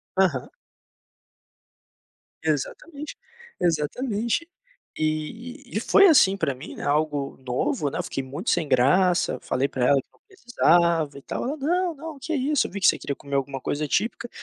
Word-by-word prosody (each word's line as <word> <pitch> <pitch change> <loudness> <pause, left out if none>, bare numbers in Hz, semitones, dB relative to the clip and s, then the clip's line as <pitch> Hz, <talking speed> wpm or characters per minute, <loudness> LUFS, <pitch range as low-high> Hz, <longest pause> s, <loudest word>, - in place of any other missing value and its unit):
Aham. 175 -10 +2 2.0
Exatamente, 280 - -3 0.4
exatamente. 215 - 0 0.5
E 220 - -3
e - - +2
foi 395 - +6
assim 195 - +6
para 155 -8 -1
mim, 130 - -9
né, - - -8
algo 145 -1 0
novo, 130 +3 -1
né. - - -5
Eu - - -1
fiquei 135 - -4
muito 130 +2 -5
sem 165 -4 +1
graça, 175 +9 +3
falei 135 +2 0
para 125 -3 -1
ela 140 0 +4
que - - -38
não - - -29
precisava 170 - +2
e - - -10
tal, - - -4
ela: 280 +5 -3
"Não, 345 +4 0
não, 310 0 -8
que 320 +4 -4
isso, 290 0 +1
eu - - -14
vi 200 - -5
que 190 - +4
você - - +5
queria 140 - -4
comer 140 0 -6
alguma 135 -1 -2
coisa 150 +1 -2
típica, 230 - -1
170 Hz, 165 wpm, -25 LUFS, -, 2.0 s, foi